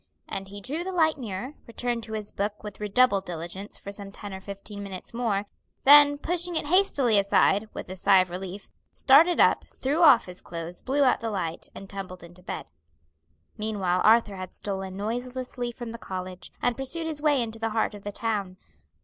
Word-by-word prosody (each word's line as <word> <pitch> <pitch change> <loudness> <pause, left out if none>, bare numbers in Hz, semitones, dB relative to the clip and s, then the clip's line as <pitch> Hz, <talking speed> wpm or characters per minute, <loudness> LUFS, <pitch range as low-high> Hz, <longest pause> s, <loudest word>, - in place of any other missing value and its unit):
And 195 0 -5
he 205 +1 -9
drew 295 - -3
the 380 - -4
light 315 -4 +2
nearer, 225 +3 -5
returned 240 0 -2
to 220 - -8
his 215 -1 -4
book 205 +1 -3
with 210 -2 -8
redoubled 210 -1 +3
diligence 175 +3 -6
for 200 - -8
some 200 -1 -8
ten 205 0 -8
or 190 - -7
fifteen 200 +1 -8
minutes 195 0 -7
more; 220 -4 0 0.4
then, 290 +1 +8
pushing 350 +3 -1
it 315 - 0
hastily 290 - +3
aside, 200 +1 +3
with - - -6
a 185 - -6
sigh 195 +1 +5
of 185 -1 -4
relief, 190 +2 -6 0.3
started 320 +6 +5
up, - - +5
threw 290 +6 -1
off 320 - +7
his 180 0 -8
clothes, 170 +1 -7
blew 280 +2 +1
out 255 - +4
the 230 - -3
light, 170 -6 -3
and 195 - -9
tumbled 190 -2 -7
into 175 +1 -14
bed. 180 - -5 0.9
Meanwhile 195 -4 0
Arthur 220 -3 +4
had 185 -1 -7
stolen 190 -2 -4
noiselessly 245 +3 -3
from 235 -1 -7
the 230 - -8
college, 185 -1 -6
and 245 -1 +2
pursued 270 +6 -4
his 310 -2 -3
way 295 -3 +3
into 225 -2 -3
the 225 0 -1
heart 220 0 0
of 205 -1 -10
the 205 - -4
town. 200 -4 -2
210 Hz, 195 wpm, -27 LUFS, 195-255 Hz, 0.9 s, then